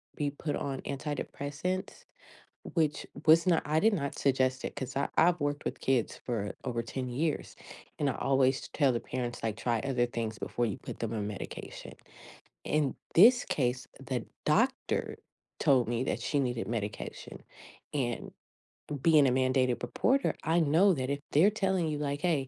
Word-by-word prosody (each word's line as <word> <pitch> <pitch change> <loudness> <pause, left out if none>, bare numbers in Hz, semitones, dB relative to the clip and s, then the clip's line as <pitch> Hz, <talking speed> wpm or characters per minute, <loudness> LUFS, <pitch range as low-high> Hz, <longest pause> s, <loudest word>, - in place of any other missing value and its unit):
be 145 -1 -1
put 145 +1 -3
on 135 -1 -3
antidepressants, 145 +5 -4 0.7
which 155 -3 +1 0.2
was 165 +3 +6
not 175 -3 +3
I 155 +1 +2
did 220 +4 +4
not 140 -6 -3
suggest 130 -1 +1
it, - - -4
'cause 130 -1 -5
I 140 - +1
I've 175 0 +4
worked 145 0 -1
with - - -3
kids 130 -4 +1
for 110 -5 -2
over 115 -1 -1
10 125 +2 -4
years, 150 +5 -2 0.4
and 145 - +1
I - - -3
always 135 -1 +2
tell 140 -3 +3
the 120 - -1
parents, 120 -1 -4
like, 110 -2 -1
"Try 115 -1 0
other 125 -2 +1
things 115 -2 -4
before 120 - -2
you 105 - -3
put - - -8
them 115 -1 -2
on 105 -2 -2
medication." 105 -2 -7 0.7
In 150 -3 +1 0.2
this 240 +8 +7
case, 125 -2 -1
the 130 -3 -3 0.2
doctor 235 - +1 0.4
told 130 -6 +4
me 120 +1 0
that - - -1
she 145 - 0
needed 125 -3 -1
medication, 105 -3 -5 0.5
and 125 -5 -2 0.6
b 150 - -2
being 155 -2 +6
a - - +3
mandated 130 -1 +2
reporter, 260 - +1
I 165 +2 +2
know 165 +6 +4
that 130 -4 -2
if 140 0 -1
they're 165 +8 +6
telling 190 -5 0
you, 150 -1 -1
like, 145 -1 -2
"Hey, 155 -7 +1
140 Hz, 170 wpm, -30 LUFS, 125-155 Hz, 0.7 s, this